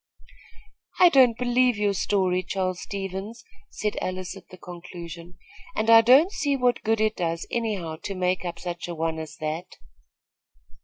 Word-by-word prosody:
"I 360 - +8
don't 255 -7 +5
believe 250 -1 +2
your 205 -1 +1
story, 185 -2 +1
Charles 185 -1 -3
Stevens," 200 +4 -6 0.3
said 210 -1 -3
Alice, 185 +1 -4
at 195 - -14
the 185 - -12
conclusion, 175 -1 -10 0.4
"and 220 +1 +2
I 225 0 +9
don't 265 - +6
see 285 -7 0
what 250 -2 +1
good 225 0 +1
it 215 0 +1
does, 165 -1 -2
anyhow, 200 -9 -2
to 200 - -3
make 185 0 0
up 175 -1 -5
such 175 -1 -6
a 175 - -5
one 160 0 -2
as 155 -1 -7
that." 155 +3 -5
190 Hz, 160 wpm, -25 LUFS, 175-225 Hz, 0.4 s, I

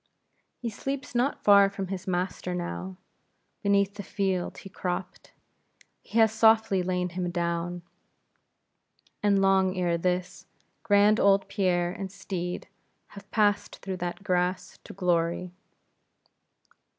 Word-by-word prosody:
He 235 -2 -4
sleeps 270 +6 -5
not 245 +4 0
far 200 -1 +7
from 195 -2 -5
his 190 -1 -5
master 180 0 -2
now; 180 +1 -5 0.6
beneath 200 -1 +2
the 205 - -7
field 190 -2 -2
he - - -10
cropt, 180 -1 -5 0.7
he 225 - -5
has 220 -1 +6
softly 220 -3 +4
lain 180 0 -1
him 180 0 -3
down; 170 0 -2 1.4
and 200 -1 +3
long 190 -1 +3
ere 175 -2 +1
this, 180 +1 -2 0.3
grand 205 0 +4
old 195 0 +4
Pierre 175 -3 +1
and 190 0 -6
steed 185 -3 -5 0.4
have 200 0 -13
passed 205 -2 +1
through 190 -1 -6
that 175 +2 -5
grass 180 -1 -1
to - - -9
glory. 175 -1 0
190 Hz, 125 wpm, -27 LUFS, 180-200 Hz, 1.4 s, far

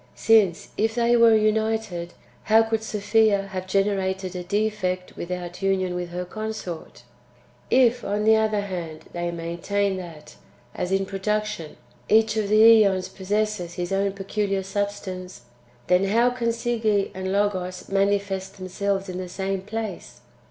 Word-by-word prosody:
Since, 205 -7 +3
if 220 +1 +1
they 240 0 +3
were 230 -1 +6
united, 215 -5 0 0.3
how 220 +1 +5
could 225 0 -1
Sophia 215 -1 +2
have 185 0 -5
generated 190 -1 0
a 180 - -3
defect 190 -2 -2
without 175 0 -6
union 190 -2 +1
with 180 -1 -4
her 180 +1 -4
consort? 215 - -6 0.7
If, 245 -1 +4
on 205 +1 -1
the 220 +1 +6
other 215 -1 +1
hand, 170 -5 -6
they 175 0 -2
maintain 175 +4 -2
that, 170 -4 -10 0.4
as 180 - -3
in 195 0 +1
production, 210 -3 -3 0.3
each 220 0 +4
of 215 -2 -1
the 215 +1 +5 0.2
zEons 190 -3 +1
possesses 200 -2 -2
his 175 0 -4
own 195 0 +1
peculiar 195 0 -2
substance, 190 -5 -4 0.4
then 180 +2 +3
how 230 +5 +3
can 240 -2 -1
Si<j^e 225 -4 0
and 190 0 -4
Loo 205 +1 +2
os 180 0 -7
manifest 195 -1 0
themselves 195 +1 -2
in 185 0 -5
the 185 -1 -5
same 190 +1 -3
place 210 - -6
195 Hz, 145 wpm, -24 LUFS, 185-215 Hz, 0.7 s, were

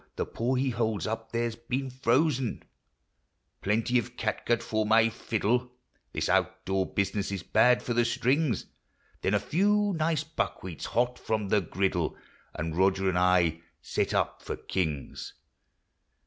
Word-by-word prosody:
The - - -1
paw 120 +3 -1
he 130 +1 +1
holds 110 -3 -1
up 115 +1 -4
there 115 0 0
's - - -9
been 125 +3 -3
frozen), 130 0 +1 1.0
Plenty 115 +4 +2
of 120 +1 -7
catgut 115 +1 0
for 110 0 0
my 115 +1 +4
fiddle 120 +3 -1 0.4
(This - - -1
out - - +1
door 95 0 0
business 100 0 -1
is 95 -3 -4
bad 125 0 +4
for 120 - -1
the 120 +1 +3
strings), 125 - +1 0.6
Then - - +1
a - - +3
few 205 +4 +2
nice 155 -1 +1
buckwheats 95 - -4
hot 125 +2 0
from 110 -3 -1
the 105 - +3
griddle, 90 -1 -1 0.4
And 80 +1 -3
Roger 95 +1 +3
and 90 - 0
I 90 -3 +3 0.3
set - - +1
up - - 0
for - - -4
kings 80 -7 -3
115 Hz, 150 wpm, -28 LUFS, 95-125 Hz, 1.0 s, my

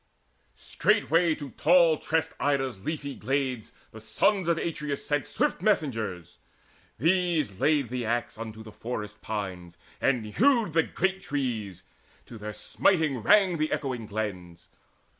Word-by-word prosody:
Straightway 165 - +2
to 145 -4 -8
tall 170 +1 +4
tressed 160 0 -1
Ida's 135 -8 0
leafy 145 -1 -3
glades 130 -2 -2 0.2
The 110 - -11
sons 190 - +1
of 170 -1 +2
Atreus 150 -4 -3
sent 145 -1 0
swift 290 - 0
messengers. 110 - -1 0.6
These 165 - +1
laid 145 -5 +2
the 125 0 -3
axe 120 +1 -1
unto 110 0 -7
the 110 - -11
forest 105 -1 -6
pines, 95 -5 -5 0.2
And 125 -5 +1
hewed 225 - +2
the 165 - +5
great 190 +3 -1
trees: 110 -10 -3 0.4
to 115 - -11
their 105 +1 -5
smiting 155 - +1
rang 190 - +4
The 155 0 0
echoing 125 -6 -2
glens. 90 -5 -5
135 Hz, 135 wpm, -27 LUFS, 110-160 Hz, 0.6 s, the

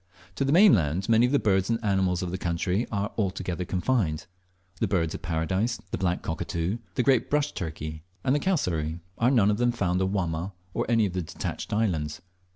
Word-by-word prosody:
To 105 - -1
the 135 - +1
mainland 100 - +5
many 115 +2 +5
of - - -3
the 145 - +4
birds 95 -5 +2
and 115 - +2
animals 95 -3 +1
of 90 - -3
the 95 - -3
country 90 +6 0
are 100 0 -1
altogether 90 -3 -2
confined; 90 -4 0 0.5
the - - +1
Birds 85 -5 0
of - - -6
paradise, 95 +8 -1
the - - -1
black 90 -2 0
cockatoo, 85 +5 -2 0.2
the 125 - +2
great 130 -1 +3
brush 150 0 +1
turkey, 80 -2 -5 0.2
and 130 - +2
the 145 - +2
cassowary, 85 - 0 0.2
are 120 - +4
none 110 -6 +4
of 105 - 0
them 120 0 +3
found 90 -6 0
on 95 0 +1
Wamma 90 -1 -2 0.2
or - - -1
any 115 -2 +4
of 95 - -3
the 90 - -1
detached 80 - -5
islands. 85 -9 0
95 Hz, 200 wpm, -27 LUFS, 85-115 Hz, 0.5 s, mainland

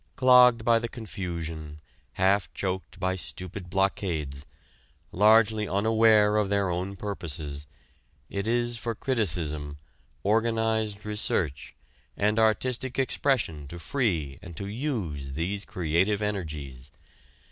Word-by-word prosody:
Clogged 125 -3 +6
by 115 -1 +5
the 115 0 -4
confusion, 85 -9 -6 0.3
half 95 +1 +2
choked 95 0 -4
by 95 0 0
stupid 90 0 -5
blockades, 85 -7 -1 0.6
largely 110 +1 +4
unaware 105 +1 +4
of 105 -2 +1
their 100 -2 +1
own 90 +3 -3
purposes, 75 -7 -5 0.6
it 100 +1 -3
is 120 0 0
for 115 0 -3
criticism, 80 - -1 0.5
organized 110 -1 +1
research, 85 -9 -1 0.4
and 105 +2 +2
artistic 120 +3 +1
expression 125 - 0
to 85 - -8
free 85 - -1
and 85 -3 -10
to 100 - -4
use 100 - -3
these 95 +7 -2
creative 90 +4 +1
energies. 75 -10 -4
100 Hz, 110 wpm, -27 LUFS, 85-110 Hz, 0.6 s, Clogged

